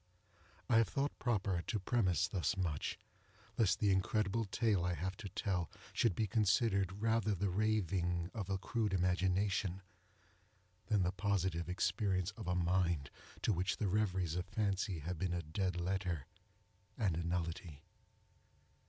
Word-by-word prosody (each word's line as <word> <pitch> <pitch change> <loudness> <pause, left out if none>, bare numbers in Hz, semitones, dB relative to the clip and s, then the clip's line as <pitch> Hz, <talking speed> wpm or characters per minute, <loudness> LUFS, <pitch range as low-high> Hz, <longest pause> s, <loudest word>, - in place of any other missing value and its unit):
I 115 - +4
have 115 -2 +5
thought 140 +9 -2
proper 100 -7 0
to 110 - 0
premise 95 - +2
thus 95 +1 -1
much, 85 -6 -1 0.6
lest 105 -3 +3
the 105 -2 +3
incredible 105 +3 +1
tale 105 -2 +1
I 90 0 0
have 95 +4 -3
to 100 - -6
tell 95 -3 -1 0.2
should 110 -7 +2
be 110 - +1
considered 100 -1 +2
rather 110 -2 +2
the 95 +1 0
raving 90 -4 0
of 100 -5 -4
a 95 - +1
crude 105 +1 -1
imagination, 95 +1 +1 1.0
than 105 -3 +3
the 90 - +1
positive 95 -3 0
experience 95 0 0
of 110 -1 -9
a 90 - +1
mind 85 -4 +1 0.3
to 110 - +3
which 90 +1 0
the 105 - 0
reveries 95 -4 +1
of 90 0 -2
fancy 100 -4 -1
have 85 +2 -4
been 90 -2 0
a 85 -1 -2
dead 90 +3 -1
letter 90 -5 -1 0.7
and 100 -8 +1
a 85 - -2
nullity. 85 -3 -3
95 Hz, 150 wpm, -36 LUFS, 90-105 Hz, 1.0 s, have